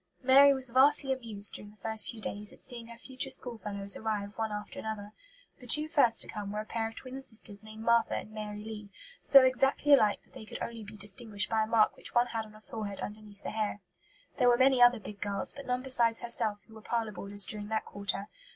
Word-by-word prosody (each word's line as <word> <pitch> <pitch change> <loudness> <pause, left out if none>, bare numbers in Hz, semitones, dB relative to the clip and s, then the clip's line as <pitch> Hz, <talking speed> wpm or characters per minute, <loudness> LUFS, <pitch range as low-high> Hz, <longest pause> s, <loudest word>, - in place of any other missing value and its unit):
Mary 275 +2 +7
was 260 -3 +1
"vastly 270 +1 +5
amused," 220 -6 -3
during 205 - -8
the 210 - -20
first 220 0 0
few 230 - -8
days, 210 -1 -3
at - - -17
seeing 235 -2 -4
her 235 0 -11
future 260 +2 -5
school 245 -3 -2
fellows 200 -1 -3
arrive 210 -2 -3
one 220 -1 -2
after 210 0 -6
another. 210 -2 -6 0.5
The 250 - -13
two 300 +6 +8
first 280 -7 +4
to - - -8
come 205 -2 -6
were 210 - -3
a 215 - -5
pair 225 0 -2
of 225 - -10
twin 260 +1 -8
sisters 220 -5 -3
named 215 0 -11
Martha 235 0 +3
and 215 - -6
Mary 210 -1 -6
Lee, 215 -2 -8 0.3
so 275 -2 +7
exactly 270 +3 +3
alike 215 -7 +4
that - - -30
they 220 - -10
could - - -8
only 230 -1 -6
be 210 +1 -11
distinguished 205 0 -4
by 220 -1 +2
a 215 - 0
mark 220 -1 +3
which - - -12
one 240 0 +5
had 225 -1 -2
on 215 - -17
her 215 - -16
forehead 210 -2 -6
under 210 +1 -6
the 205 -1 -8
hair. 215 -2 -2 0.6
There 250 -1 +5
were 240 - +4
many 260 0 +4
other 245 -1 +6
big 205 -1 -10
girls, 200 -1 -3
but 280 -1 -10
none 250 0 -1
besides 235 -3 +2
herself 225 -3 0
who 225 - -17
were 220 - -12
parlour 230 -1 -2
boarders 200 +1 -1
during 210 -1 -5
that 220 0 -2
quarter. 200 0 -3
220 Hz, 235 wpm, -30 LUFS, 210-245 Hz, 0.6 s, two